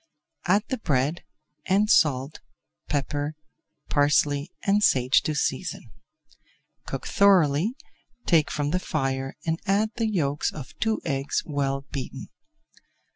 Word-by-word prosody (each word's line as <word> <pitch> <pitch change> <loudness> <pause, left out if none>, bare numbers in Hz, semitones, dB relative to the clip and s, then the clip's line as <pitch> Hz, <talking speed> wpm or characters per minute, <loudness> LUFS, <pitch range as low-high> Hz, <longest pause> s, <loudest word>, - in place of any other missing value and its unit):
Add 200 +4 +4
the 260 - -2
bread, 145 -2 0 0.4
and 200 +3 +3
salt, 145 -6 +2 0.5
pepper, 145 +1 -2 0.5
parsley, 145 +2 +2
and 200 +1 +3
sage 130 -8 +4
to 155 -2 -2
season. 145 - -2 1.0
Cook - - -5
thoroughly, 190 - +3 0.5
take 160 -4 +3
from 145 0 -2
the 180 - +1
fire 135 -5 -2
and 165 0 0
add 210 +3 +2
the 225 -2 +1
yolks 145 -8 0
of 135 -4 -9
two 220 -1 0
eggs 135 0 -1
well 140 -2 -2
beaten. 135 -3 -6
150 Hz, 120 wpm, -25 LUFS, 140-190 Hz, 1.0 s, Add